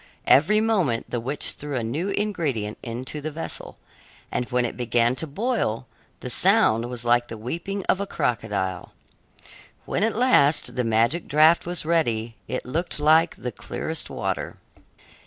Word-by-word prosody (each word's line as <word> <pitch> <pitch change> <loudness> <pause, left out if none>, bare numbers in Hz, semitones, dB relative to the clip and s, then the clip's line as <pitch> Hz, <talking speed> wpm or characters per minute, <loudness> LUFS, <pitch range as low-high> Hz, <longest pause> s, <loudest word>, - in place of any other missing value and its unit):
Every 210 +10 +5
moment 185 - 0
the 120 - -1
witch 135 +6 0
threw 145 -1 -6
a 120 - -1
new 150 - -2
ingredient 155 - -2
into 125 +5 -5
the 155 - -3
vessel, 155 +2 -6 0.5
and 125 - -1
when 125 0 +1
it - - -4
began 120 0 +1
to 160 - -3
boil, 150 - -1 0.4
the - - -5
sound 115 +2 +3
was 120 -1 -4
like 120 0 +3
the 115 - -7
weeping 170 - -4
of 190 - +1
a 200 - -3
crocodile. 100 - -2 0.9
When 200 - -1
at 225 - +1
last 215 - +4
the 125 - 0
magic 115 +9 +1
draft 155 +3 +4
was 175 -2 +2
ready, 120 -9 0
it 130 - -4
looked 160 +6 -3
like 160 +3 +4
the 125 - -5
clearest 160 +6 -5
water. - - -4
140 Hz, 155 wpm, -24 LUFS, 120-170 Hz, 0.9 s, Every